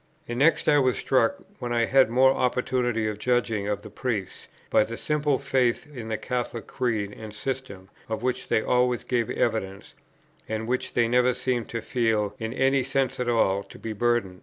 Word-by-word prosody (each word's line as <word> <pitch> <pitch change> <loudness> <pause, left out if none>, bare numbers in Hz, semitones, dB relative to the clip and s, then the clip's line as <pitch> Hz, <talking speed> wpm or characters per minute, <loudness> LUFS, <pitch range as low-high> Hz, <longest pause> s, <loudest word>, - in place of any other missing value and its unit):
And 120 +1 -3
next, 160 +4 +3
I 145 - +5
was 130 -2 +2
struck, 125 -4 +2 0.2
when 120 - -4
I 115 -1 +2
had 130 -1 +4
more 130 +3 +5
opportunity 125 -3 0
of 105 -1 -4
judging 115 -4 0
of 105 0 -2
the 105 - -10
Priests, 105 -4 -4 0.2
by - - +5
the 115 +2 -6
simple 150 -2 0
faith 130 -3 +1
in 120 -5 -7
the 110 -1 -2
Catholic 120 -3 -3
Creed 110 -6 -2
and 110 -1 -8
system, 105 -5 -5 0.2
of 110 +1 -3
which 130 0 -1
they 110 - +2
always 125 -1 +2
gave 120 -3 0
evidence, 100 -4 -2 0.6
and 110 0 -3
which 125 +1 -2
they 120 -1 +3
never 125 +1 +3
seemed 125 -2 -2
to 115 - -3
feel, 110 -4 0
in 110 0 -3
any 135 +2 +2
sense 130 0 -1
at 125 -1 0
all, 100 -4 +2
to - - -13
be 115 - -6
a - - -3
burden. 110 -4 0
120 Hz, 195 wpm, -26 LUFS, 110-130 Hz, 0.6 s, I